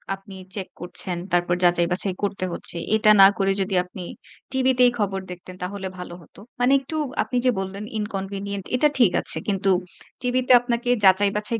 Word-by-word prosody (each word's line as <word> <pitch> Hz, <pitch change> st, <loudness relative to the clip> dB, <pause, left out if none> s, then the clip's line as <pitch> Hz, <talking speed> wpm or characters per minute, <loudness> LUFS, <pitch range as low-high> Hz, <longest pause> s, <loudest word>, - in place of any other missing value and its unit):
আপনি 195 Hz, 0 st, -14 dB, 0.2 s
চেক 190 Hz, -2 st, -4 dB
করছেন, 175 Hz, 0 st, -4 dB
তারপর 175 Hz, 0 st, +1 dB
যাচাই-বাছাই 175 Hz, +2 st, +3 dB
করতে 195 Hz, -2 st, -2 dB
হচ্ছে। 170 Hz, -, -4 dB, 0.2 s
এটা 215 Hz, -1 st, +3 dB
না -, -, +10 dB
করে 195 Hz, -1 st, +2 dB
যদি 190 Hz, 0 st, -1 dB
আপনি 180 Hz, +1 st, -11 dB, 0.5 s
টিভিতেই 255 Hz, -2 st, +3 dB
খবর 195 Hz, -2 st, -1 dB
দেখতেন, 180 Hz, +1 st, -10 dB
তাহলে 190 Hz, +1 st, -5 dB
ভালো 180 Hz, -1 st, -8 dB
হতো? -, -, -19 dB, 0.2 s
মানে 250 Hz, +2 st, +2 dB
একটু 275 Hz, +4 st, -8 dB, 0.3 s
আপনি 250 Hz, -, -4 dB
যে 250 Hz, -, +4 dB
বললেন, 195 Hz, +2 st, -5 dB, 0.2 s
ইনকনভিনিয়েন্ট 200 Hz, -1 st, -5 dB
এটা 300 Hz, +4 st, +3 dB
ঠিক 225 Hz, -7 st, +5 dB
আছে। -, -, +4 dB
কিন্তু 195 Hz, -1 st, 0 dB, 0.5 s
টিভিতে 255 Hz, 0 st, 0 dB
আপনাকে 245 Hz, 0 st, -2 dB
যাচাই-বাছাই 205 Hz, +4 st, +2 dB
195 Hz, 160 wpm, -22 LUFS, 185-235 Hz, 0.5 s, না